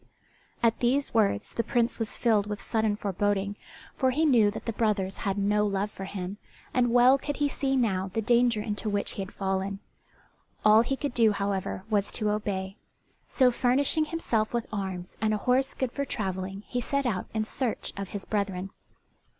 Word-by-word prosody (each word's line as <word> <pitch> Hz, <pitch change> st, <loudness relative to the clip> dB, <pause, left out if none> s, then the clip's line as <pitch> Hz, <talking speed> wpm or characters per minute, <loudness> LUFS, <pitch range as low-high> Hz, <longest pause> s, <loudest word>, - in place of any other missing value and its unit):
At 230 Hz, -1 st, +3 dB
these 265 Hz, +4 st, +1 dB
words 205 Hz, -, +1 dB
the 230 Hz, -, 0 dB
Prince 240 Hz, -2 st, 0 dB
was 225 Hz, -2 st, -3 dB
filled 215 Hz, -4 st, +2 dB
with 210 Hz, -1 st, -4 dB
sudden 220 Hz, -2 st, 0 dB
foreboding, 205 Hz, 0 st, -1 dB, 0.4 s
for 260 Hz, -, +2 dB
he 300 Hz, +5 st, +2 dB
knew 235 Hz, -8 st, +5 dB
that 205 Hz, -, -7 dB
the 230 Hz, -, -2 dB
brothers 205 Hz, -4 st, 0 dB
had 195 Hz, 0 st, -2 dB
no 205 Hz, +1 st, +2 dB
love 200 Hz, +1 st, -1 dB
for 195 Hz, -, -7 dB
him, 190 Hz, 0 st, -5 dB, 0.4 s
and 245 Hz, -2 st, +2 dB
well 250 Hz, +3 st, +6 dB
could 290 Hz, +2 st, -4 dB
he 290 Hz, -, +2 dB
see 275 Hz, -1 st, -1 dB
now 190 Hz, -6 st, +1 dB
the 225 Hz, -, -1 dB
danger 235 Hz, -1 st, +3 dB
into 210 Hz, 0 st, -3 dB
which 205 Hz, -1 st, 0 dB
he -, -, -5 dB
had 190 Hz, -, -6 dB
fallen. 195 Hz, 0 st, -2 dB, 0.9 s
All 215 Hz, +1 st, +8 dB
he 270 Hz, +3 st, -1 dB
could 280 Hz, -1 st, -3 dB
do, 225 Hz, -3 st, +4 dB
however, 200 Hz, -2 st, -2 dB
was 205 Hz, -2 st, 0 dB
to 215 Hz, -2 st, 0 dB
obey; 195 Hz, -1 st, -3 dB, 0.5 s
so 255 Hz, -2 st, +4 dB
furnishing 270 Hz, +6 st, +2 dB
himself 240 Hz, -9 st, -1 dB
with 235 Hz, -, -1 dB
arms 190 Hz, -3 st, -4 dB
and 215 Hz, -1 st, +2 dB
a 210 Hz, -, -6 dB
horse 260 Hz, +1 st, +2 dB
good 260 Hz, -3 st, -1 dB
for 280 Hz, -, -2 dB
travelling, 195 Hz, -3 st, -3 dB
he 245 Hz, -, -2 dB
set 280 Hz, +3 st, -1 dB
out 220 Hz, -7 st, -1 dB
in 215 Hz, 0 st, 0 dB
search 240 Hz, +1 st, -2 dB
of 195 Hz, -1 st, -5 dB
his 200 Hz, -2 st, -5 dB
brethren. 195 Hz, -2 st, -2 dB
215 Hz, 190 wpm, -28 LUFS, 200-245 Hz, 0.9 s, All